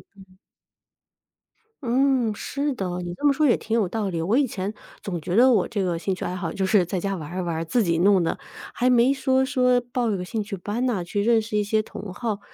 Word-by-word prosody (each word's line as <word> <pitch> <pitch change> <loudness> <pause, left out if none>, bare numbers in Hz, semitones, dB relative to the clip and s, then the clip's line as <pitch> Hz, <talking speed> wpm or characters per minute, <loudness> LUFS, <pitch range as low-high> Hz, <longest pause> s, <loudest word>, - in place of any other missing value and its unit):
嗯。 190 -1 -18 1.5
嗯， 250 -2 +2
是 285 +7 -3
的， 180 -5 -3
你 175 0 -5
这 180 - -5
么 285 - +5
说 305 +1 +2
也 245 - +4
挺 225 +1 -1
有 205 -6 +1
道 215 0 -2
理。 165 -2 -2
我 205 +10 +1
以 285 -2 +3
前 200 0 -4 0.3
总 175 -4 -4
觉 175 +4 -3
得 255 +3 +6
我 210 -7 +3
这 205 -4 -2
个 170 -2 -1
兴 190 +1 -1
趣 - - -7
爱 180 - -3
好， 175 -3 -3
就 195 - -1
是 190 -2 +3
在 185 +2 -3
家 195 +2 -2
玩 155 -5 -7
儿 180 +3 -4
一 - - 0
玩 170 -2 -2
儿， 165 - -3
自 225 +7 +1
己 170 -2 +1
弄 190 -1 +4
的， - - -2 0.3
还 250 - +1
没 250 +1 +5
说 265 -1 +2
说 250 -2 +2
报 240 -1 -2
一 205 - 0
个 180 - -4
兴 220 +4 -3
趣 205 0 -5
班 210 +7 -3
呐， 215 -8 0
去 200 +4 -2
认 230 +1 +3
识 215 -1 -3
一 210 - +2
些 215 +1 +1
同 200 -3 -8
好。 215 0 -3
210 Hz, 275 characters per minute, -24 LUFS, 180-245 Hz, 1.5 s, 得